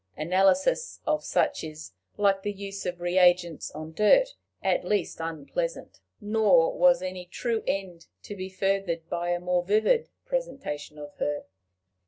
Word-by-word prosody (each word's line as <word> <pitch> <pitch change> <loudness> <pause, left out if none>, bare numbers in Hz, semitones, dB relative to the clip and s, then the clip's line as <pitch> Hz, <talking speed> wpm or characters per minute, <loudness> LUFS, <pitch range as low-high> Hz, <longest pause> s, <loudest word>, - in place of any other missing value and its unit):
Analysis 195 - +2
of 305 0 0
such 175 -3 0
is, 155 - -8 0.3
like 195 -1 +3
the 205 - -2
use 200 0 -6
of 175 -1 -4
reagents 175 -2 +3
on 155 +1 -8
dirt, 355 - +5 0.3
at - - +1
least 205 -4 -1
unpleasant. 165 - -4 0.2
Nor 205 -6 +3
was 265 -5 +4
any 185 -1 -5
true 225 +4 -2
end 185 -4 -3 0.2
to 205 - -7
be 190 -1 -6
furthered 190 -3 -1
by 175 0 -1
a 175 0 +1
more 180 0 0
vivid 220 - +2 0.2
presentation 275 - -4
of 145 -1 -9
her. 145 0 -2
185 Hz, 145 wpm, -27 LUFS, 170-210 Hz, 0.3 s, dirt